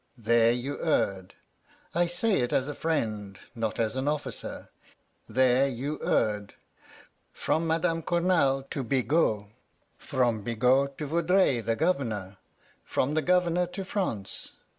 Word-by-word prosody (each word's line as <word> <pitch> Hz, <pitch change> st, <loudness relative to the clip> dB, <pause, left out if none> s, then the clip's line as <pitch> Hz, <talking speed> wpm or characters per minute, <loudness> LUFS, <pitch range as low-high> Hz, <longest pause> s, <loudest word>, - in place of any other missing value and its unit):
There 115 Hz, 0 st, +4 dB
you 125 Hz, +4 st, -3 dB
erred. 100 Hz, -, 0 dB, 0.6 s
I 175 Hz, +1 st, +2 dB
say 190 Hz, +5 st, +1 dB
it 120 Hz, -1 st, 0 dB
as 135 Hz, -, +1 dB
a 145 Hz, -, -3 dB
friend, 110 Hz, -11 st, -2 dB, 0.2 s
not 115 Hz, -3 st, -3 dB
as 110 Hz, 0 st, 0 dB
an 130 Hz, +2 st, -2 dB
officer, 150 Hz, 0 st, -4 dB, 0.6 s
there 130 Hz, +3 st, +3 dB
you 140 Hz, +4 st, -4 dB
erred. 105 Hz, -1 st, 0 dB, 0.8 s
From 165 Hz, +1 st, -1 dB
Madame 165 Hz, +1 st, +1 dB
Cournal 170 Hz, -6 st, +2 dB
to 140 Hz, -, -2 dB
Bigot, 130 Hz, -3 st, +1 dB, 0.6 s
from 120 Hz, -4 st, 0 dB
Bigot 125 Hz, +5 st, +2 dB
to 150 Hz, -, -4 dB
Vaudreuil 170 Hz, -3 st, +2 dB
the 115 Hz, +1 st, 0 dB
Governor, 115 Hz, -, -1 dB, 0.5 s
from 140 Hz, +3 st, -1 dB
the 155 Hz, -, +2 dB
Governor 180 Hz, 0 st, +2 dB
to 185 Hz, +2 st, -6 dB
France. 180 Hz, -, -4 dB
135 Hz, 130 wpm, -28 LUFS, 115-165 Hz, 0.8 s, There